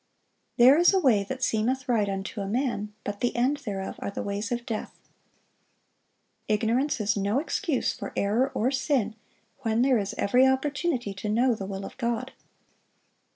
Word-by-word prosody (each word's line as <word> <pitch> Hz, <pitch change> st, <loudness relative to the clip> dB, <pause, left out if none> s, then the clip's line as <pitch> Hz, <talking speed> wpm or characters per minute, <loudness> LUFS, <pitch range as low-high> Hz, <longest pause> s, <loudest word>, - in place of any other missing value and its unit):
"There 260 Hz, +5 st, +7 dB
is 350 Hz, +3 st, +5 dB
a -, -, +4 dB
way 235 Hz, -, +3 dB
that 260 Hz, +5 st, -5 dB
seemeth 255 Hz, +4 st, 0 dB
right 220 Hz, -5 st, +2 dB
unto 195 Hz, +2 st, -4 dB
a 195 Hz, -, -3 dB
man, 220 Hz, -2 st, -1 dB
but 205 Hz, 0 st, -5 dB
the 245 Hz, -, 0 dB
end 255 Hz, +5 st, +2 dB
thereof 200 Hz, -8 st, -5 dB
are -, -, -3 dB
the 200 Hz, -, -5 dB
ways 205 Hz, +2 st, -3 dB
of 240 Hz, 0 st, -2 dB
death."(1031) 220 Hz, -2 st, -5 dB, 1.5 s
Ignorance 230 Hz, +7 st, +1 dB
is 210 Hz, -1 st, +1 dB
no 200 Hz, +3 st, 0 dB
excuse 315 Hz, -1 st, -1 dB
for -, -, -7 dB
error 225 Hz, +7 st, +1 dB
or 250 Hz, +4 st, +1 dB
sin, 265 Hz, -5 st, 0 dB, 0.4 s
when 230 Hz, -2 st, +1 dB
there 260 Hz, -3 st, +3 dB
is 200 Hz, -1 st, -4 dB
every 250 Hz, +6 st, +4 dB
opportunity 265 Hz, -, 0 dB
to 195 Hz, +2 st, -5 dB
know 240 Hz, +4 st, +3 dB
the 195 Hz, -3 st, -5 dB
will 195 Hz, 0 st, -5 dB
of -, -, -9 dB
God. 240 Hz, +1 st, -2 dB
235 Hz, 170 wpm, -27 LUFS, 205-265 Hz, 1.5 s, There